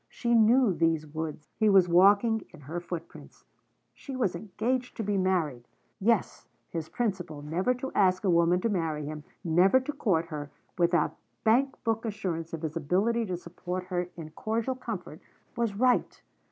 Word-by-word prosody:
She 235 -1 -1
knew 230 -1 +5
these 165 -2 +1
woods; 155 0 -6
he 215 -1 +4
was 190 -3 +6
walking 200 +6 +5
in - - -14
her 155 +6 -5
footprints; 175 -1 -9 0.5
she 275 - -8
was 220 -9 0
engaged 230 +7 -2
to 225 - -2
be 205 0 0
married. 165 -10 0 0.3
Yes, 220 0 0 0.2
his 160 -2 -4
principle, 180 -10 -3
never 180 +11 0
to 265 +2 -5
ask 185 -1 +3
a 195 - +2
woman 170 +1 +3
to 230 - +1
marry 160 -6 -1
him, 150 0 -6 0.2
never 180 +8 +4
to 295 +3 -4
court 185 - +1
her, 150 -2 -5 0.3
without 175 -2 +2 0.3
bank 260 +5 +3
book 225 -1 0
assurance 185 -7 -3
of 165 0 -6
his 160 0 -3
ability 200 +9 +1
to 180 -2 -2
support 180 +1 -5
her 180 -1 -1
in 155 -2 -8
cordial 225 +9 -2
comfort, 215 -11 -7 0.3
was 230 -4 -1
right. 250 +3 +1
185 Hz, 165 wpm, -28 LUFS, 165-225 Hz, 0.5 s, was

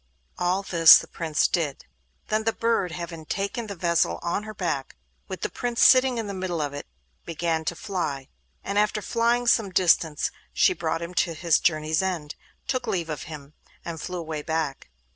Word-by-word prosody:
All 180 +2 +1
this 165 -4 +8
the - - -5
Prince 160 -3 0
did. 155 -6 -2 0.4
Then 215 +1 +1
the 225 0 +1
bird—having 175 -7 -2
taken 200 +3 -3
the 200 - -6
vessel 170 -1 +1
on 170 +4 -1
her 215 - -7
back, 150 - -3 0.3
with - - -6
the - - 0
Prince 240 -1 -1
sitting 255 -1 +6
in 225 - -2
the 200 - -5
middle 185 -3 -3
of 145 -2 -2
it—began 145 - -5
to 175 - -2
fly. 155 -9 -3 0.4
And 200 - 0
after 210 0 +1
flying 235 +1 +1
some 225 -4 +3
distance 170 -4 +2 0.2
she 370 - +4
brought 165 - -2
him 170 +2 -7
to 170 -1 0
his 165 0 +2
journey's 155 -1 +1
end, 170 -6 -3 0.3
took 255 -2 -2
leave 175 -6 -1
of 150 - -5
him, 150 -2 -10 0.3
and 165 -2 -5
flew 180 - -5
away 160 -3 -4
back. 155 - -3
170 Hz, 180 wpm, -25 LUFS, 155-200 Hz, 0.4 s, this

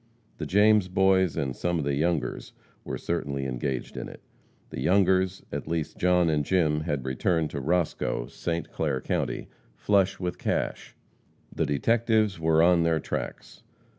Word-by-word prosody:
The 80 - -3
James 105 +2 +4
Boys 95 -2 +2
and 65 -2 -2
some 85 -1 -1
of 75 - -2
the 70 - 0
Youngers 75 -3 -1 0.3
were - - -4
certainly 70 -5 -3
engaged 65 0 -3
in - - -5
it. - - -12 0.5
The - - -5
Youngers, 95 0 +2
at - - -4
least 80 -2 -3
John 90 -1 +3
and 75 -2 +1
Jim, 75 -2 +2
had 75 -4 -3
returned 80 +5 0
to 70 - -4
Roscoe, 80 -5 0
St. 85 0 -4
Clair 75 -5 -1
county, - - -2 0.3
"flush 95 +6 +2
with 90 -1 -3
cash." - - -2 0.6
The - - -1
detectives 110 - +1
were 80 0 +3
on 85 0 +5
their 85 -1 +2
tracks. - - -6
85 Hz, 155 wpm, -27 LUFS, 75-95 Hz, 0.6 s, on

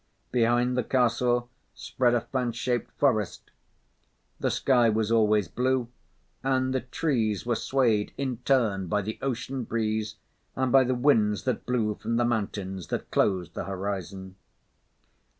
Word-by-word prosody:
Behind 120 +1 +2
the 125 - +1
castle 120 0 +1 0.3
spread 120 -2 +1
a 120 - +1
fan 125 -1 -2
shaped 120 +1 -2
forest. 110 -9 0 0.9
The - - 0
sky 120 -4 +3
was 110 0 0
always 105 -4 +3
blue, 125 +1 0 0.5
and 130 -1 +1
the 130 - +1
trees 120 - -1
were 120 - +1
swayed 115 -3 +1
in 130 -3 -2
turn 115 -7 +1
by 105 +3 0
the 110 +3 -5
ocean 130 0 -3
breeze 110 -2 -2 0.4
and 130 -1 0
by 135 -1 +6
the 130 +1 0
winds 115 -6 +2
that 130 -4 -2
blew 115 -4 +1
from 110 +2 -3
the 120 - +2
mountains 100 -5 -2
that - - -4
closed 90 -4 +1
the - - -4
horizon. 95 -1 -5
120 Hz, 145 wpm, -27 LUFS, 105-125 Hz, 0.9 s, by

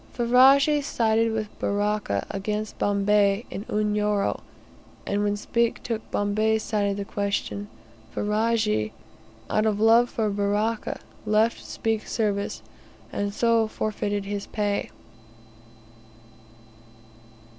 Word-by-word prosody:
Ferajji 270 +5 +5
sided 225 -4 +1
with 215 -1 -4
Baraka 205 - 0
against 210 +2 -3
Bombay 205 +1 +2
in 200 - -5
Unyoro, 210 -1 0 0.6
and 205 +1 0
when 205 0 0
Speke 235 +2 0
took 225 -2 -4
Bombay's 215 +2 +1
side 205 -2 0
of 200 - -2
the 200 - -3
question, 200 0 -3 0.4
Ferajji, 210 - 0 0.5
out 215 +1 +1
of 210 -1 0
love 230 +2 +5
for 215 -2 -1
Baraka, 205 +2 -1 0.3
left 215 +2 +2
Speke's 225 -1 -3
service, 205 -3 -1 0.5
and 205 0 -1
so 230 +1 +2
forfeited 205 -2 -2
his 200 0 -4
pay. 205 -1 -1
210 Hz, 105 wpm, -25 LUFS, 205-225 Hz, 0.6 s, Ferajji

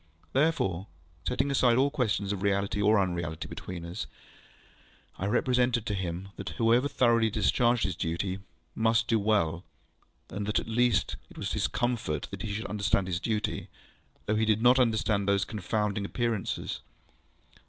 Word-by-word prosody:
Therefore, 120 - +1 0.4
setting 140 - +1
aside 125 -3 +4
all 140 +2 +3
question 120 -8 0
of 95 - -5
reality 100 0 0
or 105 +1 +5
unreality 85 -4 -2
between 85 -2 -7
us, 85 +5 -5 1.1
I 95 - -1
represented 125 +1 +2
to 105 - -1
him 95 0 -3
that 100 - -5
whoever 120 +4 +4
thoroughly 115 -4 +3
discharged 120 +3 +2
his 95 -2 -1
duty 90 +4 -2 0.3
must 115 +1 +2
do 115 -1 +3
well, 95 -5 +1 0.7
and 100 +2 -4
that 105 - +1
at - - -2
least 120 +1 +2
it - - -15
was - - -3
his - - +1
comfort 115 -12 -2
that 100 -1 -6
he 110 0 -3
understood 100 -2 +1
his 90 -2 -2
duty, 105 0 -2 0.6
though 110 - +1
he 110 - +2
did 110 +1 +2
not 125 +2 +6
understand 110 -4 +2
these 100 -1 +2
confounding 105 -1 -1
Appearances. 115 -1 -2
105 Hz, 155 wpm, -29 LUFS, 95-115 Hz, 1.1 s, not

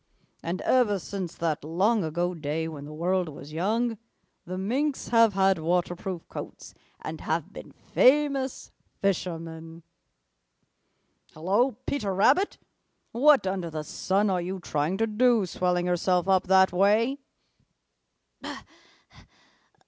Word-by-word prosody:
And 175 +3 -4
ever 235 -6 +3
since 190 -2 -6
that 160 -4 -2
long 190 +7 +1
ago 175 +3 -1
day 160 0 -3
when 150 -3 -8
the 150 - -9
world 175 +2 -1
was 145 0 -11
young, 220 +6 0 0.5
the 185 +1 -5
Minks 265 +9 -1
have 230 -3 +4
had 190 -2 +3
waterproof 175 +1 -2
coats - - -9 0.3
and - - -6
have - - -2
been - - -10
famous 275 -1 +1 0.3
fishermen. 165 -3 -3 1.5
Hello, 200 +11 +1
Peter 205 -9 -2
Rabbit! 280 - +3 0.5
What 275 +1 +5
under 185 -3 -2
the 155 -1 -5
sun 195 +6 0
are 180 -1 0
you 185 +2 -4
trying 155 +2 -1
to 225 - +2
do, 225 -1 +2
swelling 180 0 -1
yourself 180 0 +1
up 190 -1 +2
that 190 0 +5
way?" 215 +9 +2
190 Hz, 120 wpm, -27 LUFS, 170-220 Hz, 1.5 s, What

